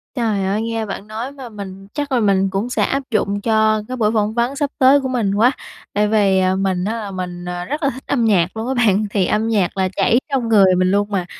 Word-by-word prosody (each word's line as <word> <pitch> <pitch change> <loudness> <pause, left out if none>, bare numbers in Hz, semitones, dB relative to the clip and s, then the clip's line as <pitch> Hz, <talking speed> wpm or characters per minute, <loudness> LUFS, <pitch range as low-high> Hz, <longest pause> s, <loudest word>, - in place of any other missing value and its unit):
Trời 220 -6 0
ơi, 200 +3 0
nghe 225 -1 -2
bạn 195 0 -7
nói 225 +5 -5
mà 265 -4 -10
mình 195 -2 -9
chắc 290 -1 -4
là 255 - +2
mình 195 -3 +2
cũng 200 +5 -2
sẽ - - 0
áp 275 +1 -1
dụng 205 -1 0
cho 215 -1 +2
cái 255 0 -5
buổi 215 -2 +2
phỏng 215 -1 0
vấn 240 +3 0
sắp 285 0 -1
tới 275 +2 +5
của 265 - -2
mình 230 -6 0
quá. 235 +5 +4 0.4
Tại 210 +1 +2
vì, 205 -3 +3
à, 185 0 +2
mình 190 -1 -1
á 220 - -1
là 205 -2 -6
mình, 180 -1 -6
ờ, 180 0 -4
rất 295 - -4
là 275 - +3
thích 260 0 -8
âm 240 -5 +1
nhạc 190 -2 +2
luôn 220 +2 -3
á 265 - 0
bạn, 215 -4 +2
thì 195 -3 +1
âm 215 +4 0
nhạc 200 -5 0
là 190 -1 +1
chảy 235 - +3
trong 260 -5 -1
người 195 -4 +5
mình 185 0 +2
luôn 205 +1 +1
mà, 185 -3 -1
215 Hz, 265 wpm, -19 LUFS, 195-240 Hz, 0.4 s, tới